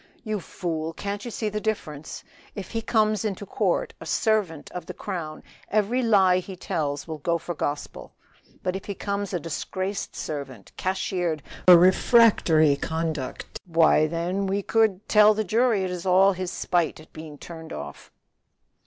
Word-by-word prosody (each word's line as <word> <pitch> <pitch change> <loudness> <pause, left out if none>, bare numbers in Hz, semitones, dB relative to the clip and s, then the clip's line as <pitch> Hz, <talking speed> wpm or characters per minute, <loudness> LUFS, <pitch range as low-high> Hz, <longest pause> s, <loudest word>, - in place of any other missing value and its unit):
"You 215 -2 -2
fool, 165 -3 -4
can't 200 +3 -5
you - - -4
see 220 -1 -3
the 210 0 -4
difference? 160 -9 -4 0.3
If 200 -3 -7
he 225 - -2
comes 215 -2 +1
into 205 -2 -3
court - - -1
a - - -7
servant 205 -9 0
of 180 - -7
the - - -7
crown 170 -7 -5 0.3
every 215 +4 +1
lie 195 -6 +4
he 185 +1 -8
tells 145 -4 -3
will 160 -2 -6
go 170 +3 0
for 175 +1 -5
gospel. 145 -2 -4 0.5
But 185 0 -1
if 190 - -6
he 200 - -5
comes 200 0 -3
a 180 - -1
disgraced 185 +5 -4
servant, 135 -8 -6
cashiered 180 -4 -2 0.2
for 180 -1 +11
refractory 180 - +5
conduct, 160 -3 -4
why 165 -2 +4
then 175 +4 -2
we 200 +1 -1
could 215 -3 +1
tell 210 0 +6
the 215 - 0
jury 220 0 +2
it 185 - -2
is 180 0 -5
all 190 +2 +5
his 185 -1 -4
spite 170 -4 0
at 155 - -16
being 155 -2 -9
turned 160 +1 -10
off." 70 -1 -8
185 Hz, 165 wpm, -25 LUFS, 160-205 Hz, 0.5 s, for